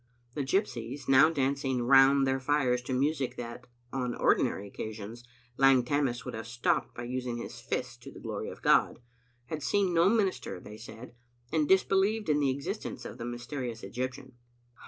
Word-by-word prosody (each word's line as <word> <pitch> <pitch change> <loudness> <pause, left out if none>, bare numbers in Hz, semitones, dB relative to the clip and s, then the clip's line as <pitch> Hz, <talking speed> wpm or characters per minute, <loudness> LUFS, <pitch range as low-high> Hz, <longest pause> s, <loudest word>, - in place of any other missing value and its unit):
The 150 - -2
gypsies, 130 - -2
now 135 +4 +7
dancing 135 -4 0
round 135 +2 +6
their 135 0 +1
fires 130 -2 +1
to 130 - -3
music 140 0 0
that, 120 +1 -7 0.3
on 125 -2 -2
ordinary 100 +1 +1
occasions, 110 +3 -7 0.3
Lang 135 -2 +5
Tammas 135 -3 0
would - - -5
have 110 0 -6
stopped 120 +1 0
by 120 - -6
using 125 -1 -3
his 115 - -7
fists - - -3
to - - -12
the - - -12
glory - - -5
of - - -11
God, - - +4 0.5
had 155 +4 -5
seen 190 +4 +1
no 170 +2 +5
minister, 195 - 0
they 105 +3 -11
said, 120 +2 -11 0.4
and 155 -2 +2
disbelieved 195 +2 +3
in 150 -1 +3
the 140 -2 +2
existence 140 +1 -4
of - - -8
the 115 - -4
mysterious 120 -1 -5
Egyptian. 130 +6 -5
130 Hz, 170 wpm, -30 LUFS, 120-145 Hz, 0.5 s, now